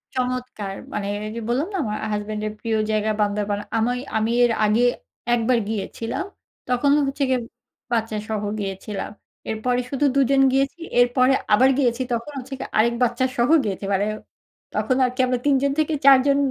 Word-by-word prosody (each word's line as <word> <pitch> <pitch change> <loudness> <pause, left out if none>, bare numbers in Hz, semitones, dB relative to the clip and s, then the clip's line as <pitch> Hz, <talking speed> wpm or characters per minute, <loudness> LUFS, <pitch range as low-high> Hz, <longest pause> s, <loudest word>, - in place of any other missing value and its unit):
চমৎকার 250 -6 -3 0.2
মানে, 200 -1 -2 0.2
এই 215 - -5
যে 230 - -4
বললাম 255 +7 0
না 385 - -1
আমার 215 -1 -3 0.2
হাসব্যান্ড 210 0 -3
এর 210 - -5
প্রিয় 225 -1 -1
জায়গা 215 0 +1
বান্দরবন। 205 0 0 0.2
আমি 230 +2 +2 0.3
আমি 220 +1 0
এর 240 - +4
আগে 215 +3 +3 0.5
১ 240 - +3
বার 245 - +4
গিয়েছিলাম, 225 - -3 0.4
তখন 250 +3 +2 0.2
হচ্ছে 275 +1 -2
গিয়ে 260 -1 +2 0.5
বাচ্চা 225 -2 0
সহ 215 -1 -2 0.2
গিয়েছিলাম। 195 +1 -5 0.4
এরপরে 245 +3 0
শুধু 280 +2 0
২ - - +4
জন 275 -1 +4
গিয়েছি 275 +5 0 0.2
এরপরে 255 +2 +4 0.2
আবার 255 +5 +6
গিয়েছি 250 -2 +1
তখন 235 +5 -3
হচ্ছে 265 +1 -9
কি - - -4
আরেক 235 +2 +4
বাচ্চা 245 +1 +1
সহ 240 +3 +2
গিয়েছি। 195 -1 -3
মানে 195 +1 +2 0.7
তখন 255 - 0
আর 250 - +3
কি - - -17
আমরা 250 -1 0
৩ 285 -1 +4
জন 280 - +2
থেকে 310 +1 +1
৪ 275 -1 +9
জন 280 - +4
240 Hz, 180 wpm, -22 LUFS, 215-260 Hz, 0.7 s, ৪